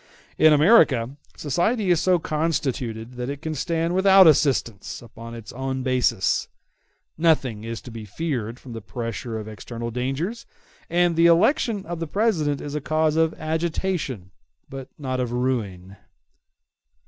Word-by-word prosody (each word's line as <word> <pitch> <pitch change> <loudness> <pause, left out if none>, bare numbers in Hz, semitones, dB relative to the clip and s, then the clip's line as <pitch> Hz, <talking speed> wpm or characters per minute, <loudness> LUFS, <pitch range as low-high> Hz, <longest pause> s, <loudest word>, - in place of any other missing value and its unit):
In 155 - +7
America 145 - +4 0.2
society 180 - 0
is 170 -2 +3
so 185 0 +3
constituted 135 -8 -2
that 125 +1 -4
it 140 0 -5
can 160 +1 -4
stand 165 +3 -1
without 190 0 +6
assistance 135 - +2
upon 115 0 -11
its 115 -2 -10
own 130 0 -3
basis; 125 -7 +1 0.7
nothing 135 -10 +1
is 115 0 -5
to 125 - -11
be 115 -1 -8
feared 120 - -4
from 125 - -10
the 115 - -6
pressure 115 +1 -5
of 110 -1 -7
external 115 +2 -6
dangers, 135 - -3 0.4
and 175 0 +2
the 165 +1 +5
election 200 - +3
of 170 0 -5
the 165 - -3
President 160 -8 0
is 145 - -6
a 150 - -2
cause 155 +1 +1
of 160 0 +2
agitation, 160 - -3 0.4
but 135 -1 -8
not 130 -3 -3
of 125 -2 -2
ruin. 105 -7 -3
140 Hz, 150 wpm, -23 LUFS, 120-165 Hz, 0.7 s, In